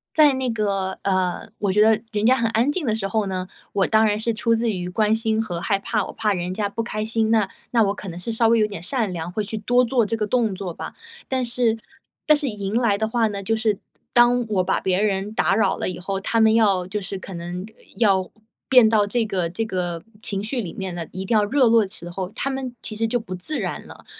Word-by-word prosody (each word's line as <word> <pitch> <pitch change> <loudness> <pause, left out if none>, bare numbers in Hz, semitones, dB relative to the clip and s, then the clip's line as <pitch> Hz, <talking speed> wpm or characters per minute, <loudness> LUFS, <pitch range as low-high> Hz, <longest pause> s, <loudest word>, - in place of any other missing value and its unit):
在 300 -3 +6
那 260 -1 -1
个， 200 -4 -1
呃， 185 -2 0
我 200 -2 +1
觉 210 - +4
得 220 0 +4
人 210 0 -1
家 255 +3 +6
很 230 -2 +1
安 235 +6 +2
静 315 0 -2
的 220 - +2
时 215 -3 -3
候 215 +1 0
呢， 185 -1 -3 0.3
我 195 -2 +2
当 220 0 +4
然 210 -1 +2
是 230 +1 0
出 230 +1 +1
自 230 0 0
于 180 -3 -4
关 210 +3 +2
心 220 0 +1
和 175 -6 -4
害 200 +1 +1
怕， 210 +1 -1
我 - - -7
怕 215 -2 0
人 180 -1 -3
家 205 +1 -1
不 230 - -3
开 215 -2 -3
心， 220 0 0
那 215 -4 +3 0.2
那 230 -2 +4
我 200 -1 +1
可 205 - -9
能 170 - -7
是 205 +6 -3
稍 225 0 +3
微 230 +1 +4
有 215 - +4
点 205 -5 -7
善 220 +2 -1
良， 165 -1 -4
会 210 +4 -2
去 215 +2 -5
多 245 +4 +3
做 240 -2 +2
这 225 - -1
个 215 - 0
动 220 -2 +1
作 185 -2 -5
吧。 - - -8 0.3
但 260 -1 0
是 235 -1 +1 0.5
但 305 - +6
是 295 -1 -2
迎 205 -1 -4
来 230 -5 +2
的 220 +1 0
话 230 -1 +2
呢， 200 -2 -4
就 225 +4 +1
是 220 -2 +1 0.4
当 240 0 +5
我 200 -4 +1
把 190 - +1
别 190 +1 0
人 205 0 0
打 185 -3 +2
扰 220 - +2
了 - - -2
以 180 - -6
后， 195 +2 -3
他 230 +3 0
们 220 0 +5
要 200 -5 +3
就 210 +2 -3
是 195 +1 -3
可 190 0 -9
能 175 +2 -5
呃， 220 - -18 0.2
要 195 -4 +2 0.4
变 250 -4 +7
到 215 -2 +3
这 230 +3 0
个 185 -4 -1
这 185 +7 -2
个 175 -5 -3 0.2
情 200 -3 -1
绪 235 +4 -2
里 180 -6 -6
面 190 -2 -5
呢， 170 -1 -4
一 185 +1 -5
定 220 +3 +2
要 210 - +3
热 255 +4 +3
络 230 -1 +5
的 190 - -12
时 175 -4 -7
候， 180 +1 -4
他 275 - -2
们 265 -2 -4
其 215 - -1
实 225 +1 0
就 245 +2 0
不 185 -5 -7
自 245 +13 0
然 - - -4
了。 - - -14
215 Hz, 285 characters per minute, -23 LUFS, 190-230 Hz, 0.5 s, 变